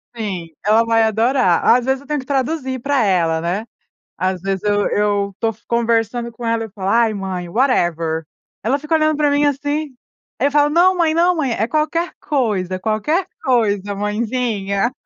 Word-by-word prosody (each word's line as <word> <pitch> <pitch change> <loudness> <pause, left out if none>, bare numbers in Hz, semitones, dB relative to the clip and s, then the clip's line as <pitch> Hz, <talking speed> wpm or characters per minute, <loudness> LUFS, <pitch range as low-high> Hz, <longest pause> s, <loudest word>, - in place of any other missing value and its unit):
Sim, 195 -7 -4 0.2
ela 220 +2 +4
vai 225 0 +3
adorar. 220 -4 +2
Às 245 +1 +5
vezes, 265 0 +1
eu 280 - -17
tenho 300 0 -1
que - - -14
traduzir 265 -1 -1
para 275 0 +1
ela, 170 -5 +1
né. 180 +6 -2 0.5
Às 185 -1 -2
vezes, 195 -1 -2
eu 205 -1 +1
eu 205 -1 0
tô 225 - +1 0.2
conversando 235 0 0
com 235 +1 -10
ela, 230 0 0
eu 220 - -9
falo: 195 -1 -5
"Aí, 230 -1 +3
mãe, 190 -3 -4
whatever". 170 - 0 0.4
Ela 255 +7 +1
fica 300 +2 -2
olhando 310 -1 +2
para 295 -1 +2
mim, 285 +1 +2
assim. 290 +1 -2 0.4
Aí, 280 - +2
eu - - -8
falo: 290 0 +4
"Não, 350 +5 +4
mãe. 330 -3 +2
Não 350 +2 +3
mãe. 275 -6 0
É 220 -1 0
qualquer 310 +4 -1
coisa, 210 -11 -1
é - - -3
qualquer 220 - 0 0.2
coisa, 205 - +1
mãezinha". 210 0 -1
230 Hz, 185 wpm, -19 LUFS, 200-280 Hz, 0.5 s, Às